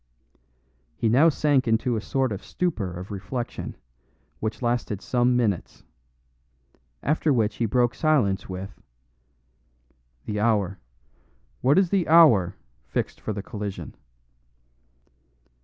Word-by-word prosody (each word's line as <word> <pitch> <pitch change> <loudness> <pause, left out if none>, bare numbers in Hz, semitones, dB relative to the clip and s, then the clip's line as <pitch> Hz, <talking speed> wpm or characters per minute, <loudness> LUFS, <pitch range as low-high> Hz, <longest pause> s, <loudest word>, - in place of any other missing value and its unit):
He 115 - 0
now 140 +9 +6
sank 145 -4 +1
into 115 +2 +1
a 110 - -2
sort 130 +1 -1
of 100 - -5
stupor 135 - -2
of 90 +4 -8
reflection, 120 +5 -5 0.6
which 110 +3 -4
lasted 120 -4 -1
some 125 +2 +1
minutes; 105 -8 -1 1.2
after 155 +1 +1
which 110 -5 +1
he 115 - 0
broke 120 +2 +2
silence 125 -13 +1
with: 95 +1 -7 1.4
"The 105 -1 -3
hour 105 -4 +1 0.8
what 140 +6 +4
is 190 -3 +3
the 195 -4 +1
hour 145 - +6 0.3
fixed - - -4
for - - -3
the 100 -2 -4
collision?" 105 -2 -6
115 Hz, 115 wpm, -25 LUFS, 100-135 Hz, 1.4 s, now